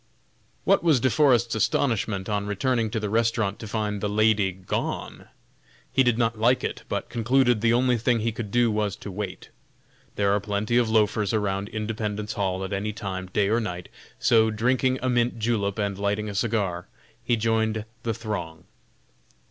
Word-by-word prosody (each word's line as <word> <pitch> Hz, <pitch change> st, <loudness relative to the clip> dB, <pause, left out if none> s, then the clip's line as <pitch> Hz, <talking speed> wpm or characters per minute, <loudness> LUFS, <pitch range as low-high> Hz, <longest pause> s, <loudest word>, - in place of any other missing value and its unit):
What -, -, +3 dB
was 160 Hz, -6 st, +4 dB
De 130 Hz, +1 st, +2 dB
Forest's 120 Hz, -5 st, +3 dB
astonishment 110 Hz, -4 st, 0 dB
on 100 Hz, -1 st, -1 dB
returning 115 Hz, +2 st, 0 dB
to 110 Hz, +1 st, -2 dB
the 105 Hz, -, -2 dB
restaurant 115 Hz, -2 st, +1 dB
to 110 Hz, -, -7 dB
find 105 Hz, -1 st, -2 dB
the 105 Hz, -, -1 dB
lady 105 Hz, -2 st, +3 dB
gone! 95 Hz, 0 st, -4 dB, 0.7 s
He 135 Hz, -, +4 dB
did 120 Hz, -3 st, +3 dB
not 115 Hz, -2 st, 0 dB
like 120 Hz, +3 st, +3 dB
it, -, -, -3 dB
but -, -, -2 dB
concluded 120 Hz, 0 st, +2 dB
the 115 Hz, 0 st, +3 dB
only 125 Hz, 0 st, +2 dB
thing 120 Hz, +1 st, +2 dB
he 115 Hz, +1 st, 0 dB
could 110 Hz, -1 st, -6 dB
do 120 Hz, +1 st, +3 dB
was 105 Hz, -2 st, -1 dB
to 100 Hz, -, -8 dB
wait. 95 Hz, -1 st, -6 dB, 0.7 s
There 100 Hz, -1 st, +2 dB
are 105 Hz, -, +2 dB
plenty 105 Hz, +3 st, -1 dB
of 120 Hz, -2 st, +2 dB
loafers 105 Hz, -1 st, +2 dB
around 100 Hz, -1 st, -1 dB
"Independence 105 Hz, -1 st, -3 dB
Hall" 95 Hz, -2 st, -1 dB
at 95 Hz, -, -4 dB
any 105 Hz, +2 st, -2 dB
time, 95 Hz, -4 st, -5 dB
day 100 Hz, +2 st, +1 dB
or 110 Hz, +3 st, +2 dB
night, 90 Hz, -6 st, -5 dB, 0.3 s
so 110 Hz, -2 st, +4 dB
drinking 125 Hz, +4 st, +1 dB
a -, -, +1 dB
mint 120 Hz, -1 st, +1 dB
julep 105 Hz, -3 st, -1 dB
and 100 Hz, -2 st, -1 dB
lighting 105 Hz, +1 st, -1 dB
a -, -, -5 dB
cigar, 100 Hz, -5 st, -1 dB, 0.4 s
he 120 Hz, 0 st, +2 dB
joined 110 Hz, -1 st, 0 dB, 0.2 s
the 115 Hz, -2 st, -2 dB
throng. 90 Hz, -8 st, -5 dB
110 Hz, 180 wpm, -25 LUFS, 100-115 Hz, 0.7 s, was